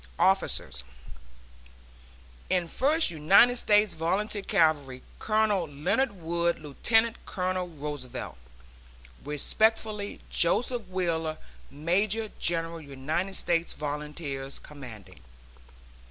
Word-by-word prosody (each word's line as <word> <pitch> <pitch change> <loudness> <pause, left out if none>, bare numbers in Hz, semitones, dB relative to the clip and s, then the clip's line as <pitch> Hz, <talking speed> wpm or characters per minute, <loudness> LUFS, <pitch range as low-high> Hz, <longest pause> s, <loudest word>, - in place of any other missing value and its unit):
OFFICERS..... 185 - +1 1.7
In 180 -2 +1
First 290 - +1
United 195 +10 +5
States 210 -3 +4
Volunteer 200 +6 -1
Cavalry 155 -10 +1 0.2
Colonel 215 -5 +1
Leonard 155 - 0
Wood, 170 +1 0
Lieutenant 225 - +1
Colonel 185 -1 -2
Roosevelt. 145 - -6 0.9
Respectfully, 210 +7 +1
JOSEPH 235 +5 +2
WHEELER, 165 -4 -1 0.3
Major 200 +9 0
General 165 -1 -1
United 155 +7 -3
States 170 -1 0
Volunteers, 145 -2 -5
Commanding. 125 - -11
170 Hz, 80 wpm, -28 LUFS, 150-205 Hz, 1.7 s, United